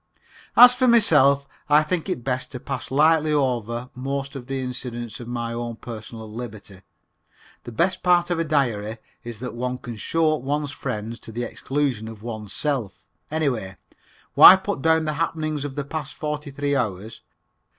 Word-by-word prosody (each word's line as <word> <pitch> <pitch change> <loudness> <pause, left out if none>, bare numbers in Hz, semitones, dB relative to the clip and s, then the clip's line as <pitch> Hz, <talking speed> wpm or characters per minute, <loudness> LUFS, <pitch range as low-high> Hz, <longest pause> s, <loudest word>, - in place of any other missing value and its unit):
As 245 0 +10
for 255 +1 +1
myself, 140 - +4 0.2
I 150 +1 +6
think 175 +3 -2
it 125 -10 -3
best 130 0 -2
to 125 - -5
pass 130 0 -5
lightly 155 +2 +3
over 125 -4 -1
most 135 +2 -4
of 125 -2 -8
the 135 0 -3
incidents 120 -2 -6
of 120 - -8
my 120 -1 -3
own 120 0 -4
personal 110 -1 -9
liberty. 105 -4 -9 0.8
The 120 - -7
best 170 +11 0
part 175 -1 +3
of 170 - 0
a - - +2
diary 120 -8 0 0.3
is 120 -2 -7
that 125 - -5
one 125 +1 -3
can 120 -2 -8
show 155 +7 +1
up - - -10
one's 145 +2 -2
friends 115 -5 -5
to - - -10
the 120 +2 -4
exclusion 130 -4 -2
of 110 -1 -10
oneself. 115 +2 -4 0.3
Anyway, 125 - -2 0.6
why 185 - +11
put 190 -4 -4
down 160 +1 +3
the 155 - -1
happenings 155 -3 -2
of 135 -2 -6
the 145 -1 -3
past 150 -1 -5
forty 150 -1 -4
three 140 +1 -1
hours? 110 -4 -3
135 Hz, 170 wpm, -23 LUFS, 120-150 Hz, 0.8 s, why